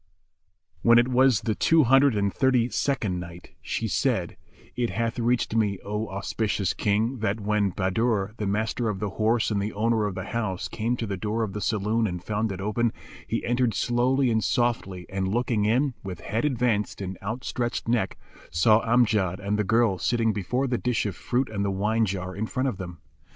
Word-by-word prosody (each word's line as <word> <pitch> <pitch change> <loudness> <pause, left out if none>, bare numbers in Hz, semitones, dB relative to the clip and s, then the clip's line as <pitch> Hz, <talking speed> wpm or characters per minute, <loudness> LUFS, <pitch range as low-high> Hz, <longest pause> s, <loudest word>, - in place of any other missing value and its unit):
When 120 0 +6
it 120 +2 +4
wad 130 +1 +5
the 110 -1 0
Two 160 +7 +4
Hundred 135 0 +5
and 100 -1 0
Thirty 130 -3 +2
second 115 -5 -1
Night, 85 0 -10
She - - -2
said, - - 0 0.4
It 120 -1 0
hath 115 +1 -2
reached 120 -1 +1
me, 105 -3 +1
O 105 +2 -2
auspicious 100 0 -1
King, 110 +5 0
that 105 0 -1
when 105 -1 +1
Bahadur, 100 +2 0
the 105 - -2
Master 110 +3 -1
of 105 - -2
the 105 -1 -2
Horse 110 +2 +1
and 100 -1 0
the 105 +2 -3
owner 110 0 +1
of 100 - -5
the 95 - -4
house, 100 -3 -3
came 115 +2 -2
to 115 - -2
the 100 -2 -3
door 110 +4 -1
of 100 -3 -4
the 105 - -4
saloon 110 +2 +1
and 90 -2 -5
found 105 +2 -1
it 95 - -5
open, 110 +4 0 0.4
he - - -2
entered 120 -1 +1
slowly 125 +2 +2
and 110 -1 +1
softly 115 -8 0
and 95 -1 -2
looking 110 0 0
in, 130 +5 +2
with 90 -3 -6
head 110 - -1
advanced 120 -6 0
and 95 -1 -4
out 110 +6 -4
stretched 120 -2 -2
neck, 120 -1 0 0.3
saw 105 +8 +4
Amjad 110 -6 +2
and 100 +1 -1
the - - +2
girl 110 -2 +2
sitting 115 -2 +1
before 125 +7 -1
the 125 -2 -1
dish 125 -3 0
of 100 - -3
fruit 125 +2 -1
and 100 -2 -3
the 100 - 0
wine 105 +4 +1
jar 95 -1 -4
in 110 +2 -2
front 130 +4 -1
of 105 - -5
them. 90 -3 -8
110 Hz, 200 wpm, -26 LUFS, 100-120 Hz, 0.4 s, When